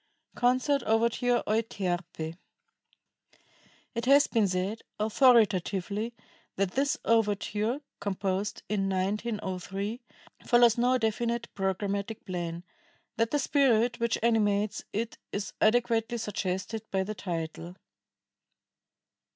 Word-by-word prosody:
CONCERT 255 +3 +2
OVERTURE, 235 +2 +2
"EUTERPE" 175 -7 -2 1.6
It 235 +1 -3
has 280 +2 +6
been 220 -4 +2
said 185 +4 -2 0.2
authoritatively 215 -2 +3 0.4
that 195 -1 0
this 275 +5 +1
overture 220 +3 +1 0.2
(composed 195 0 -2
in 195 -2 0
1903) 200 +2 -2 0.4
follows 240 -1 +5
no 250 +2 +3
definite 235 +1 -1
programmatic 200 +2 -2
plan; 175 -2 -4 0.5
that 230 0 +2
the 295 - +1
spirit 250 -4 +2
which 235 -1 +1
animates 210 -3 +2
it 225 +2 -3
is 205 0 -4
adequately 230 0 +2
suggested 210 0 -3
by 190 -1 0
the 210 +3 -4
title. 170 -2 -5
215 Hz, 95 wpm, -29 LUFS, 195-235 Hz, 1.6 s, has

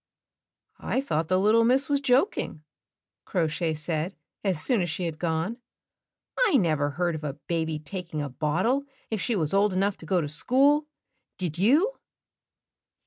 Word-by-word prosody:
"I - - -1
thought 165 - -1
the 185 - +2
Httle 215 +4 +4
Miss 260 +3 +3
was 280 -1 +1
joking," 260 - +1 0.6
Crow 180 -5 0
Shay 160 +1 -1
said 160 +3 -2 0.3
as 190 -6 +1
soon 235 - +2
as 175 - -1
she 165 +4 -3
had 160 -2 -4
gone. 165 +6 -1 0.8
"I 445 - +5
never 155 - +1
heard 175 -1 +1
of 155 -1 -6
a 145 -2 -4
baby 160 -2 -1
taking 170 0 -6
a 145 - -2
bottle 165 - 0 0.3
if 220 -3 -1
she 240 - 0
was 160 -4 -1
old 200 0 +3
enough 195 +2 +1
to 160 - -12
go 185 0 +2
to 155 - -2
school, 275 - +3 0.5
did 170 -3 -3
you? 310 - +3
180 Hz, 165 wpm, -27 LUFS, 160-235 Hz, 0.8 s, I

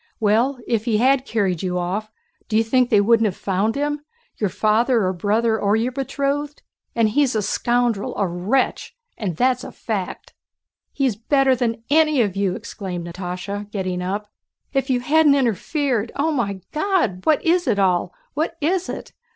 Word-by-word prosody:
Well, 225 +6 +2
if 225 -2 0
he 225 -3 +2
had 260 +3 +3
carried 195 -7 0
you 180 -1 -1
off... 190 +5 -2 0.4
do 215 - +2
you 225 - +4
think 250 +2 +2
they 210 -2 +5
wouldn't 225 +1 +4
have 190 - -4
found 200 +3 0
him? 295 +1 -1 0.4
Your 210 - 0
father, 225 +2 +2
or 185 - 0
brother, 220 +5 +1
or 200 +1 +2
your 230 +3 0
betrothed? 280 +2 -2 0.3
And 230 -2 +3
he's 260 +2 +2
a 215 - +1
scoundrel, 240 -2 0
a 200 - +2
wretch—that's 245 - -1
a - - -7
fact!" 200 -5 -5 0.6
"He 275 - -1
is 245 -6 +1
better 265 +4 +2
than 230 -2 -2
any 305 -2 +4
of 200 -3 -2
you!" 195 -2 0
exclaimed 180 -4 -6
Natásha 185 +4 -5
getting 185 -3 -3
up. 200 +3 -3 0.5
"If 270 -1 0
you 250 -2 +1
hadn't 295 +2 +4
interfered... 250 - 0
Oh, 300 +3 +1
my 200 -9 -2
God! 305 - 0
What 310 -2 +3
is 345 -1 +2
it 225 -5 +2
all? 180 -2 +2 0.2
What 320 +3 -2
is 360 +4 0
it? - - -7
225 Hz, 170 wpm, -21 LUFS, 200-275 Hz, 0.6 s, they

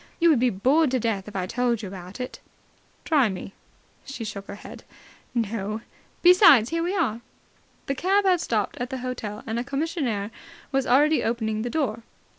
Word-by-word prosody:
You 335 0 +5
would 285 - +3
be 250 +1 +3
bored 265 +10 +3
to 255 0 0
death 210 -4 -2
if 210 - -10
I 185 -2 -1
told 235 +2 0
you - - -4
about 185 +2 -9
it." 250 - -5 0.7
"Try 285 -8 +3
me." 190 0 -7 0.5
She 270 -4 -7
shook 200 -2 -6
her 200 - -7
head. - - -11 0.5
"No. 215 -1 -2 0.4
Besides, 350 - +7
here 330 0 0
we 355 +4 -1
are." 235 - 0 0.6
The 275 - -1
cab 385 +8 +2
had 365 -3 +3
stopped 215 -3 -1
at 245 0 -3
the 265 - -4
hotel, 220 -4 -5
and 225 +1 -2
a - - -2
commissionaire 275 - -2 0.4
was 270 -1 0
already 295 +5 +4
opening 220 -2 -1
the 240 - -3
door. 255 -7 -1
245 Hz, 185 wpm, -25 LUFS, 215-295 Hz, 0.7 s, Besides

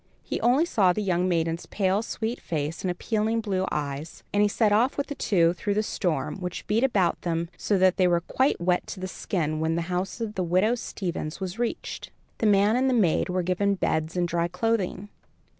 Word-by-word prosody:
He - - -3
only 255 +7 +4
saw 195 - +3
the 210 - -2
young 180 -1 +1
maiden's 165 -1 -1
pale, 195 0 +1
sweet 230 +1 -4
face 155 0 -3
and 185 - -1
appealing 220 +5 0
blue 190 -4 -1
eyes, 145 +1 -4
and 205 - +3
he 210 - +5
set 210 +1 +2
off 230 +6 +3
with 285 - 0
the 285 - -5
two 175 -10 +2
through 200 +3 -2
the 215 - +2
storm, 155 -9 -2
which 180 -1 -5
beat 220 +4 +1
about 195 -10 +2
them 170 -1 -2
so 205 - 0
that 185 0 +4
they 185 - +4
were 170 -1 +2
quite 260 - +1
wet 180 +1 +1
to - - -7
the 185 - -4
skin 155 -5 -2
when 160 +1 0
the 170 - -1
house 185 +6 -2
of 220 -2 -4
widow 185 +6 +2
Stevens 175 -9 -4
was 190 +3 -5
reached. 240 -1 -3 0.3
The 225 - +2
man 205 +2 +4
and 260 +1 +2
the 255 - +2
maid 185 -8 +2
were 180 0 0
given 195 +3 +1
beds 160 -2 -1
and 175 -1 +1
dry 170 0 0
clothing. 205 +1 -1
185 Hz, 210 wpm, -26 LUFS, 170-215 Hz, 0.3 s, he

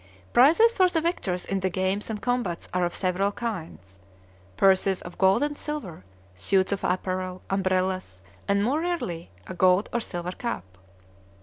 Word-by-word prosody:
Prizes 330 - +6
for 370 -5 +3
the 335 - +1
victors 210 - -2
in 195 - -1
the 190 0 0
games 190 +3 -1
and 215 -2 -3
combats 245 -9 -1
are 180 -1 +2
of 175 - -3
several 190 +2 0
kinds, 125 - -6 0.6
purses 190 0 +3
of 175 - -10
gold 190 +7 +4
and 295 0 -1
silver, 265 - -6 0.3
suits 190 - +1
of 200 - -2
apparel, 185 0 -2
umbrellas, 185 - 0 0.3
and, 200 0 +2
more 275 +8 +1
rarely, 300 - -3 0.2
a - - -7
gold 185 +2 +3
or 240 - +1
silver 175 -5 -4
cup. 95 - -6
190 Hz, 160 wpm, -26 LUFS, 180-235 Hz, 0.6 s, Prizes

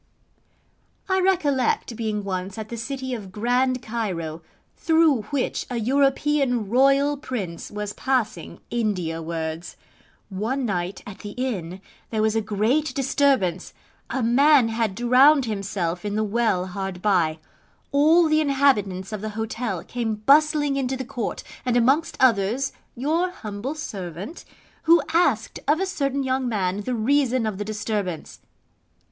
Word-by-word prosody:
I 380 0 +2
recollect 290 -11 +1
being 215 -2 -2
once 190 +1 -4
at 215 -1 -6
the 235 - -5
city 260 +2 -4
of 205 -6 -6
Grand 250 +4 0
Cairo, 180 -9 -3 0.3
through 320 -6 +3
which 280 -3 -2
a 245 - -3
European 270 -1 +1
Royal 275 +4 +4
Prince 205 - -5
was 210 0 -5
passing 255 -5 -2
India 185 -8 -1
wards. 160 0 -5 0.5
One 225 +7 -2
night 185 -2 -3
at 205 - -9
the 205 0 -8
inn 190 -8 -3 0.3
there 215 -1 0
was 220 0 +1
a 225 - +2
great 220 +10 0
disturbance: 265 - +1 0.3
a 265 - -1
man 260 +1 +5
had 225 -3 -1
drowned 255 +5 +5
himself 195 -5 -3
in 205 0 -3
the 215 - +1
well 215 -4 +1
hard 190 -1 -5
by: 175 -6 +2 0.5
all 315 +4 +5
the 310 0 +3
inhabitants 225 -10 +1
of 210 - -4
the 215 - -3
hotel 220 -4 -3
came 230 -3 -3
bustling 290 +4 +3
into 265 -1 -1
the 260 - -5
Court, 245 -4 -4 0.2
and 245 -2 +1
amongst 270 +7 +2
others 235 +2 +2 0.2
your 315 +8 0
humble 225 - -6
servant, 195 - -7 0.4
who 335 +1 +7
asked 295 -10 +1
of 300 +3 +3
a 385 - +1
certain 280 -7 -1
young 260 -1 0
man 195 -2 -1
the 245 +4 -2
reason 255 +1 +2
of 210 -3 -3
the 205 - -3
disturbance. 205 -5 -4
235 Hz, 140 wpm, -24 LUFS, 200-275 Hz, 0.5 s, who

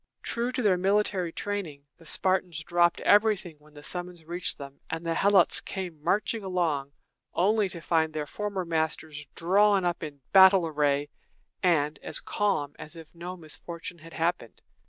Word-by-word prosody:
True 240 +1 -2
to 255 - -1
their 195 -4 +4
military 195 -2 +1
training, 175 -8 -4 0.2
the 165 - -13
Spartans 180 -3 0
dropped 175 +1 +2
everything 205 -6 +3
when 150 0 -21
the 145 - -12
summons 175 -1 -7
reached 175 +2 -2
them; 140 0 -10
and 165 +1 -4
the 165 - 0
Helots 195 0 +4
came 180 -6 -6
marching 215 +4 0
along, 160 -7 -1 0.4
only 205 +2 +2
to 170 -2 -6
find 160 -1 +1
their 155 -1 -3
former 200 +2 -4
masters 160 -2 -2
drawn 195 +2 +3
up 175 -1 -1
in 145 -3 -7
battle 190 -2 +8
array, 145 -2 0 0.5
and 155 -5 +2
as - - +3
calm 190 -9 -1
as 155 - -7
if 165 -2 -12
no 175 +2 -7
misfortune 170 +1 -6
had 165 +1 -13
happened. 165 -8 -2
170 Hz, 160 wpm, -28 LUFS, 155-190 Hz, 0.5 s, battle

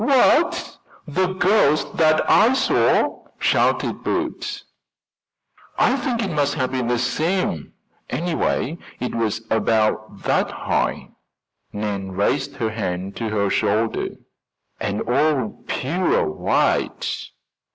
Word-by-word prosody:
"What, 275 +6 +3 0.3
the 180 +4 0
ghost 185 -6 +2
that 155 -1 +3
I 230 +5 +5
saw?" 265 - +2
shouted - - +1
Bert. - - -3 1.1
"I - - +3
think 245 -3 -1
it 195 - -2
must 145 -2 +1
have 130 -4 -1
been 130 -2 -1
the 120 0 +1
same. 155 - -1 0.4
Anyway, 170 -2 -1 0.2
it 125 - -3
was 110 -1 -1
about 110 -2 0
that - - +1
high" - - -2 0.6
Nan 100 -2 -4
raised 135 +9 0
her 110 -2 -2
hand 95 -3 -4
to 115 -2 -2
her 100 -2 0
shoulder 110 +2 +1 0.7
"and 100 +1 -2
all 130 -2 0
pure 175 +8 0
white." - - 0
130 Hz, 110 wpm, -22 LUFS, 110-170 Hz, 1.1 s, I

